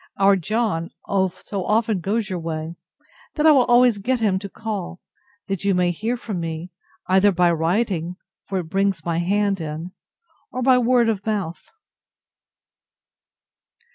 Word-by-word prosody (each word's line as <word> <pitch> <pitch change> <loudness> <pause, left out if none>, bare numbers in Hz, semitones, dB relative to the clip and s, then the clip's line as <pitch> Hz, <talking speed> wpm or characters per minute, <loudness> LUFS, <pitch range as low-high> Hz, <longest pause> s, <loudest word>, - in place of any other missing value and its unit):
Our 195 0 +5
John 195 -2 -1 0.5
so 195 -3 -4
often 215 -1 +1
goes 205 +4 -1
your 185 -3 -3
way, 160 0 -4 0.6
that 300 - +1
I 315 - +8
will 265 -4 +5
always 245 -3 +4
get 250 +5 0
him 200 -4 +1
to 200 0 -7
call, 190 -5 -5 0.5
that 195 -3 -3
you 200 -1 +2
may 180 -1 +2
hear 225 +8 -2
from 215 -6 -5
me, 165 +1 -5 0.3
either 190 +2 +4
by 175 -1 +3
writing, 175 +1 0 0.3
(for 195 - -2
it 180 - -1
brings 195 -1 0
my 170 -1 0
hand 200 +1 +1
in,) 160 +3 -5 0.6
or 255 - -3
by 255 0 +5
word 245 -1 +3
of 210 -3 -1
mouth. 200 -6 -3
195 Hz, 150 wpm, -22 LUFS, 175-225 Hz, 0.6 s, I